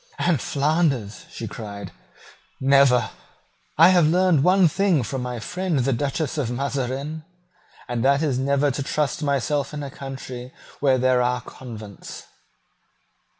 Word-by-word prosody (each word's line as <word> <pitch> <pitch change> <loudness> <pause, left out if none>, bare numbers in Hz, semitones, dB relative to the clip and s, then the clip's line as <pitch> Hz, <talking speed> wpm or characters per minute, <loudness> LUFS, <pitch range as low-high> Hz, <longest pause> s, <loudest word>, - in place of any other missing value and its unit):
"And 160 -8 +1
Flanders," 140 -7 0
she 115 - -6
cried; 100 -2 -8 0.7
"never! 135 -4 +4 0.7
I 165 +3 +8
have 175 -4 +5
learned 175 -3 +3
one 185 +1 +5
thing 175 -4 +1
from 125 +4 -4
my 125 -1 -4
friend 180 +6 -2
the 135 +1 +1
Duchess 145 +4 -2
of 130 -5 -1
Mazarin; 140 +4 -3 0.6
and 120 -1 -2
that 140 +3 +3
is 135 -5 0
never 140 +1 +2
to 140 - -4
trust 145 +1 -1
myself 145 0 -1
in 145 - -4
a 140 - -6
country 130 -2 -8 0.2
where 135 -2 +3
there 130 0 +3
are 125 0 0
convents." 110 -5 -10
135 Hz, 140 wpm, -23 LUFS, 125-150 Hz, 0.7 s, I